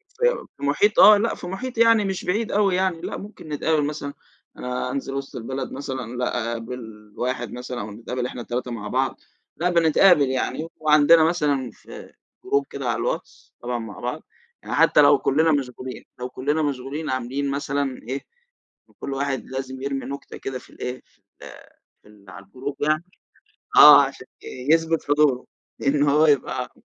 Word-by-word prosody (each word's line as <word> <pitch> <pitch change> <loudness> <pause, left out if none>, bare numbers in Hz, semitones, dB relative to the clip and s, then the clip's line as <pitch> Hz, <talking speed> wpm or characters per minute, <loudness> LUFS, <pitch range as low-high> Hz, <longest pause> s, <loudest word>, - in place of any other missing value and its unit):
في 485 +1 +1
في - - -11
محيط، 175 +9 +2
آه 210 +1 +9
لا، 225 +3 0
في 175 - -8
محيط 240 +6 -5
يعني 230 -2 +5
مش 190 -1 -3
بعيد 210 +5 -1
أوي 200 -3 +2
يعني، 185 -3 0
لا، - - -4
ممكن 205 -6 -11
نتقابَل 150 +1 +1
مثلًا 145 -1 -4 0.4
أنا 125 0 -3
انزِل 135 0 -4
وسط 135 0 -5
البلد 130 +3 -5
مثلًا، 130 -3 -5
لأ، 120 -2 -1
أقابِل 115 -3 -8
واحد 125 -2 -2
مثلًا 125 0 -6
ونتقابَل 115 +4 -5
إحنا 125 - -6
ال3 125 +1 -4
مع 110 -3 -5
بعض، 130 +4 -1 0.4
لأ 180 +2 +1
بنتقابَل 165 -3 +5
يعني. 130 +5 -2
وعندنا 155 +1 +5
مثلًا 150 -6 0
في - - -13 0.4
group 415 +1 +2
كده - - -5
على - - +1
الواتس، - - -5
طبعًا 120 0 -3
مع 115 -3 -8
بعض - - -4 0.4
يعني، - - -4
حتى - - +5
لو - - +6
كُلَّنا 160 +4 +2
مشغولين 130 -2 -3 0.2
لو 125 0 -4
كُلَّنا 145 +5 -1
مشغولين 145 +2 -3
عاملين 130 +2 -2
مثلًا 140 -1 -2
إيه، 135 +3 -3 0.8
كل 140 - -4
واحد 135 -1 -2
لازم 130 0 -6
يرمِي 135 0 -3
نكتة 140 +1 -7
كده 130 -1 -5
في - - -19
ال - - -17
إيه، 125 0 -4
في - - -33 0.3
ال - - -9 0.5
في - - -21
ال 100 -2 -18
على 100 +1 -11
الgroup 130 +8 -6
يعني، 155 +2 +1 0.7
آه - - +10
عشان - - -5 0.4
يُثبِت 165 -1 +2
حضوره، 145 -3 +2 0.4
إن 145 +1 +3
هو 150 +2 +4
يبقى 130 -3 0
140 Hz, 170 wpm, -23 LUFS, 125-160 Hz, 0.8 s, آه